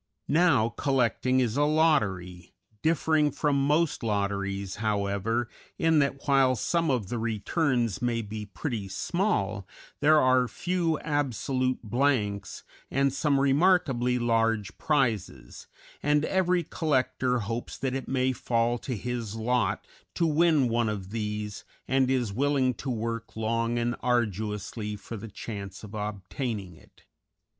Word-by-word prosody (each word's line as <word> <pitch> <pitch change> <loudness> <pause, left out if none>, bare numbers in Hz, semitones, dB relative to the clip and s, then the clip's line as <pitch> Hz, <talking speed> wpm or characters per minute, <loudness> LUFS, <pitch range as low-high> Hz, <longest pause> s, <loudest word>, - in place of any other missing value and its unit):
Now 150 -8 +4
collecting 130 0 +1
is 125 -1 0
a 145 - +4
lottery, 105 - +1 0.3
differing 155 -1 +2
from 140 -1 +1
most 155 +1 +2
lotteries, 100 -2 -2
however, 105 +2 0 0.3
in 160 -1 +3
that 140 -1 -1
while 135 -2 +4
some 165 +7 0
of 120 -8 0
the 120 - -2
returns 115 - 0
may 120 -2 0
be 105 0 -6
pretty 100 +2 -4
small, 100 - -1 0.3
there 155 +1 +5
are 130 -1 +4
few 175 +1 -1
absolute 130 -3 -1
blanks 110 -3 0 0.3
and 140 0 +1
some 140 0 +1
remarkably 135 -4 +3
large 115 -4 +1
prizes, 110 - -1 0.3
and 150 +1 +2
every 180 -2 +1
collector 130 -5 0
hopes 115 +4 -4
that 130 -2 -2
it 135 -2 -4
may 130 0 +1
fall 120 0 0
to 125 -2 -4
his 120 -2 -4
lot 115 -2 0 0.3
to 170 - +2
win 155 -3 +3
one 115 -1 +1
of 100 -3 -5
these, 105 -2 -4 0.2
and 130 -1 +2
is 125 -6 0
willing 135 +1 +2
to 135 - -6
work 115 -1 -3
long 115 +1 0
and 120 +1 0
arduously 105 -2 -1
for 105 +3 -8
the 110 +1 -7
chance 100 -1 -7
of 105 0 -10
obtaining 105 0 -4
it. - - -22
120 Hz, 135 wpm, -27 LUFS, 105-140 Hz, 0.3 s, there